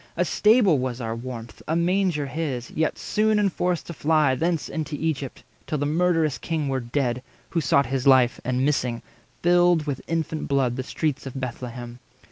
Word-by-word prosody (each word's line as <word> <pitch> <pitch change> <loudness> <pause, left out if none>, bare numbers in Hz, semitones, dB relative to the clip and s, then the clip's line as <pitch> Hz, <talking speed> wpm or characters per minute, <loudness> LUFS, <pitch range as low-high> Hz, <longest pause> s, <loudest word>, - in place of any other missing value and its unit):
A 180 - +2
stable 210 - +4
was 125 -1 -3
our 115 -2 -3
warmth, 115 -2 -8
A 160 - 0
manger 175 -3 +1
his; 135 -4 -4
yet 160 0 0
soon 215 0 +1
enforced 180 -4 0
to 170 - -7
fly 155 -3 +2
Thence 165 +3 0
into 155 -2 -4
Egypt, 145 -5 -3 0.2
till 155 - -1
the 145 - -1
murderous 160 -1 +1
king 155 -4 -2
Were 135 -1 0
dead, 125 0 -1 0.3
who 165 - +1
sought 140 -1 +3
his 130 +1 -1
life, 130 -2 +5
and, 130 +2 0
missing, 125 -5 0 0.4
filled 175 -2 +4
With 140 -4 -3
infant 160 -1 -2
blood 135 -3 +1
the 130 - -2
streets 140 +1 -2
of 135 0 -6
Bethlehem. 120 -1 -6
145 Hz, 175 wpm, -24 LUFS, 130-165 Hz, 0.4 s, life